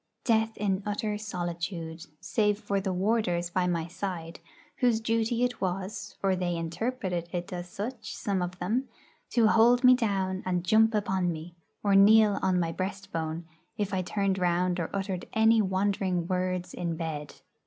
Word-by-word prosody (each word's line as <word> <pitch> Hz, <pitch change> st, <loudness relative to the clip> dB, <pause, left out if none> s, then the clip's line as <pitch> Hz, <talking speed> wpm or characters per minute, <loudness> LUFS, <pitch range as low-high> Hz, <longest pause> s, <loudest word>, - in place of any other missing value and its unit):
Death 225 Hz, -2 st, +2 dB
in 195 Hz, -2 st, 0 dB
utter 210 Hz, +1 st, -2 dB
solitude, 175 Hz, -4 st, -4 dB
save 210 Hz, +2 st, +1 dB
for 200 Hz, -2 st, -1 dB
the 190 Hz, 0 st, -1 dB
warders 180 Hz, -3 st, 0 dB
by 180 Hz, 0 st, +1 dB
my 170 Hz, -2 st, 0 dB
side, 170 Hz, -1 st, -5 dB, 0.4 s
whose 240 Hz, -3 st, +3 dB
duty 230 Hz, +1 st, 0 dB
it 245 Hz, -1 st, -1 dB
was 195 Hz, +2 st, -3 dB
or 190 Hz, -1 st, +3 dB
they 175 Hz, -1 st, -1 dB
interpreted 175 Hz, 0 st, -3 dB
it 175 Hz, 0 st, -4 dB
as 175 Hz, 0 st, -5 dB
such, 220 Hz, +3 st, -5 dB
some 195 Hz, -3 st, -1 dB
of 180 Hz, +1 st, -3 dB
them 225 Hz, +10 st, -1 dB, 0.4 s
to 235 Hz, -2 st, +3 dB
hold 235 Hz, +3 st, +5 dB
me 255 Hz, 0 st, +9 dB
down 195 Hz, -6 st, 0 dB
and 180 Hz, -2 st, -1 dB
jump 220 Hz, +3 st, +4 dB
upon 190 Hz, -4 st, +1 dB
me, 165 Hz, +1 st, -7 dB, 0.3 s
or 200 Hz, -1 st, +3 dB
kneel 210 Hz, +1 st, +6 dB
on 185 Hz, -1 st, +2 dB
my 165 Hz, -1 st, 0 dB
breastbone, 185 Hz, -4 st, -4 dB, 0.3 s
if 205 Hz, -1 st, -2 dB
I 185 Hz, -, +1 dB
turned 195 Hz, +1 st, 0 dB
round 180 Hz, 0 st, +1 dB
or 165 Hz, -, -2 dB
uttered 195 Hz, -2 st, -3 dB
any 220 Hz, 0 st, +5 dB
wandering 190 Hz, -2 st, 0 dB
words 185 Hz, 0 st, -1 dB
in 170 Hz, -2 st, -2 dB
bed. 155 Hz, -3 st, -5 dB
190 Hz, 165 wpm, -28 LUFS, 175-215 Hz, 0.4 s, me